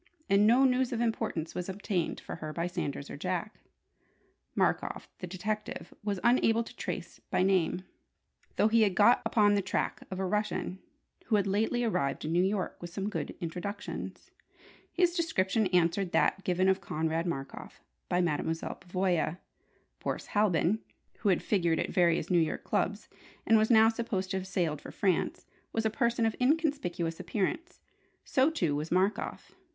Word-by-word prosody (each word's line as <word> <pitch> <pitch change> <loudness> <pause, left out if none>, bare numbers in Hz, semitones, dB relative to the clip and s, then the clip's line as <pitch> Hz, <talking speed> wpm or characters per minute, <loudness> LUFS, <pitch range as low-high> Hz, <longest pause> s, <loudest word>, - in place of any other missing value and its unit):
And 200 +1 +5
no 250 +4 +6
news 255 -1 +2
of 235 - -2
importance 225 -8 -1
was 180 +1 -4
obtained 190 -3 -2
for - - -7
her 155 -1 -5
by 170 +1 -1
Sanders 145 -5 -3
or - - -6
Jack. 185 +6 -3 1.0
Markoff - - 0
the 180 - -5
detective 210 +4 -4
was 205 -2 -1
unable 235 -1 +4
to - - -12
trace - - -5
by - - +2
name, 185 -1 +2 0.7
though - - +4
he 225 +1 +4
had 200 -4 +3
got 210 +5 +6
upon 205 -2 +4
the 200 - +2
track 185 - -2
of 190 - -5
a 190 - 0
Russian 210 -1 -1 0.5
who 220 - +2
had 200 -2 +2
lately 220 +5 +1
arrived 140 -14 0
in 155 - -2
New 175 +2 +3
York 190 -1 -1
with 175 - -6
some 195 +3 -3
good - - -4
introductions. 180 +5 -5 0.6
His 355 -1 +2
description 225 - +1
answered 180 +1 +1
that 195 - +2
given 185 +1 +2
of 190 0 +3
Konrad 160 0 -1
Markoff 135 -5 -6 0.3
by 180 - +2
Mademoiselle 165 -1 -2
Pavoya. 180 -2 0 0.6
Boris - - -3
Halbin 205 -1 +3 0.4
(who 210 - +1
had 185 - +2
figured 170 -5 +2
at - - -1
various 170 -1 +2
New 175 - +5
York 160 - -1
clubs, - - -1 0.4
and 225 - +5
was 220 0 +4
now 220 -2 +7
supposed 225 -5 -1
to 190 - 0
have 190 0 -5
sailed 170 -5 -1
for - - -9
France) 190 -3 0 0.3
was 225 0 -1
a 220 - +2
person 235 0 +1
of 225 - 0
inconspicuous 250 - 0
appearance. 325 - -3 0.4
So, 265 +2 +3
too, 170 - 0
was 150 +2 -3
Markoff. 190 +4 0
190 Hz, 165 wpm, -30 LUFS, 175-220 Hz, 1.0 s, now